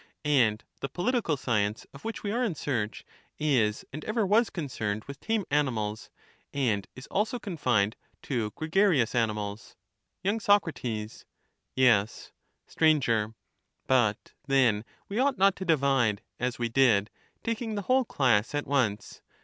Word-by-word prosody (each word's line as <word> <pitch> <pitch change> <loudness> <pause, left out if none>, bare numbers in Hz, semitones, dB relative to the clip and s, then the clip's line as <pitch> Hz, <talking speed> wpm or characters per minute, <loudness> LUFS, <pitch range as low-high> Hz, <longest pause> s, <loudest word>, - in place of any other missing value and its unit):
And 120 -7 +3 0.2
the 135 - -4
political 180 - 0
science 105 -4 -1
of 140 - -13
which 225 - -5
we 205 - -2
are 240 +3 0
in 205 -9 -1
search, 120 -8 -3 0.3
is 120 -9 +1
and 155 +2 -6
ever 215 -1 0
was 220 +4 +3
concerned 110 - -3
with 140 0 -9
tame 220 -3 -1
animals, 110 -8 -1 0.4
and 110 -8 0
is 130 - -10
also 220 +5 0
con 205 -6 -6
fined 110 -7 +1 0.3
to 120 -6 -1
gregarious 160 - +2
animals. 105 -3 -2 0.5
y. 200 - +4
SocT'YeiT"^ 165 - 0 0.6
^ 125 +7 +1
Sir. 110 -2 0 0.5
But 120 -5 +1
then 120 -6 +3 0.2
we 205 +4 -3
ought 270 0 +2
not 195 0 +4
to 190 - -5
divide, 135 - +2 0.2
as 125 0 -1
we 120 - -1
did, 115 -4 +3 0.3
taking 230 -1 -2
the 205 - -3
whole 255 +5 +3
class 125 - +1
at 145 - -1
once. 125 -8 -1
135 Hz, 140 wpm, -28 LUFS, -, 0.6 s, y